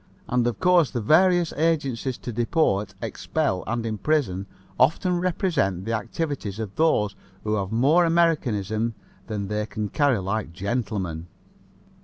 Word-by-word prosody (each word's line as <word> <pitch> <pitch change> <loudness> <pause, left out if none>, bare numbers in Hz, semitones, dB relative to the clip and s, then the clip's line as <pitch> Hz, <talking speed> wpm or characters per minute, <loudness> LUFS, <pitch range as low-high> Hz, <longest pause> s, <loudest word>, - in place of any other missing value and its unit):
And, 125 -1 +1
of 120 - -2
course, 180 -5 +4
the 120 - -3
various 175 - +4
agencies 140 -6 0
to 120 - -6
deport, 105 - +1
expel 90 -1 -1
and 115 0 -2
imprison 110 -4 0 0.3
often 175 +6 +3
represent 160 - 0
the 115 - -2
activities 115 - -3
of 110 -3 -5
those 105 -11 +2 0.3
who 105 - -1
have 100 -2 -1
more 140 +10 +4
Americanism 115 - +1 0.3
than 105 -2 -3
they 105 +1 -2
can 105 -2 -4
carry 145 -1 +2
like 95 -2 -3
gentlemen. 95 -5 -3
115 Hz, 135 wpm, -24 LUFS, 105-155 Hz, 0.3 s, course